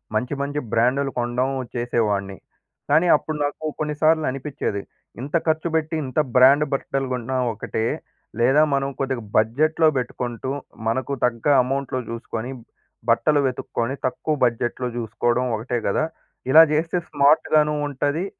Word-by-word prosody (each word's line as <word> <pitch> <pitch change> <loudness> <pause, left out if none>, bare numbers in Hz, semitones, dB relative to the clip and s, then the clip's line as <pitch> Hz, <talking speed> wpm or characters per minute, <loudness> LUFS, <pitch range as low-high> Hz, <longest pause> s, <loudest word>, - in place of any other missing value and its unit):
మంచి, 125 +5 -1
మంచి 145 +1 -2
బ్రాండ్‌లు 130 +4 +2
కొనడం 120 +2 0 0.3
చేసేవాడిని. 105 -5 -1 0.5
కానీ 160 +4 +4
అప్పుడు 155 0 -5
నాకు 145 +2 -3
కొన్నిసార్లు 155 +1 +2
అనిపిచ్చేది. 135 -7 -4 0.4
ఇంత 145 +5 -4
ఖర్చు 160 +1 +1
పెట్టి 160 0 0
ఇంత 130 +2 -2 0.2
బ్రాండ్ 135 +4 +6
బట్టలు 135 0 -2
కొన్నా 125 +1 -2 0.2
ఒకటే. 110 +1 -3 0.5
లేదా 135 +5 +4
మనం 135 0 0
కొద్దిగా 130 -3 -2
బడ్జెట్‌లో 155 +9 +3
పెట్టుకుంటూ, 125 0 -3 0.4
మనకు 130 +4 -1
తగ్గ 115 0 -2 0.2
అమౌంట్‌లో 135 0 -2
చూసుకొని 115 +1 -5 0.6
బట్టలు 145 +5 +3
వెతుక్కొని 125 0 -3
తక్కువ 150 +4 -2
బడ్జెట్‌లో 120 +1 -1
చూసుకోవడం 120 +2 0
ఒకటే 120 +2 -2
గదా! 100 +10 +1 0.5
ఇలా 160 +3 +10
చేస్తే 165 +3 0
స్మార్ట్‌గాను 150 +1 +3
ఉంటది. 145 +5 -1
135 Hz, 125 wpm, -22 LUFS, 120-150 Hz, 0.6 s, ఇలా